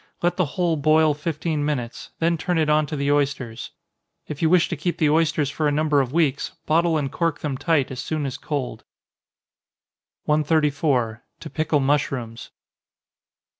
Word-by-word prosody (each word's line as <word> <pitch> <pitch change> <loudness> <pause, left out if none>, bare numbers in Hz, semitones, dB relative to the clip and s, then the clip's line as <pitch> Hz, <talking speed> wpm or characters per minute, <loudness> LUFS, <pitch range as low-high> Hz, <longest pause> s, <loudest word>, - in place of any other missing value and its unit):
Let 175 - +2
the 185 - +1
whole 175 -3 +1
boil 155 +1 +4
fifteen 155 0 -2
minutes, 130 -6 -3
then 170 +1 +1
turn 175 +2 -1
it 155 -1 +2
on 155 0 +3
to 150 - -4
the 140 0 0
oysters. 140 -5 -1 0.6
If 150 -2 -6
you 160 - +3
wish 180 -1 +4
to - - -2
keep 170 +3 -2
the 155 -3 +3
oysters 155 -2 +2
for 155 +1 0
a - - +2
number 150 -1 +2
of 130 -2 -3
weeks, 150 -4 0
bottle 165 +1 +2
and 140 -3 -2
cork 165 -2 -1
them 145 -3 -2
tight 145 -2 +1
as 125 - -6
soon 155 0 -2
as 130 - -3
cold. 130 -7 -4 1.4
134. 145 -6 +1 0.2
_To - - -9
Pickle 155 -2 +1
Mushrooms. 135 -5 -1
150 Hz, 170 wpm, -23 LUFS, 140-160 Hz, 1.4 s, boil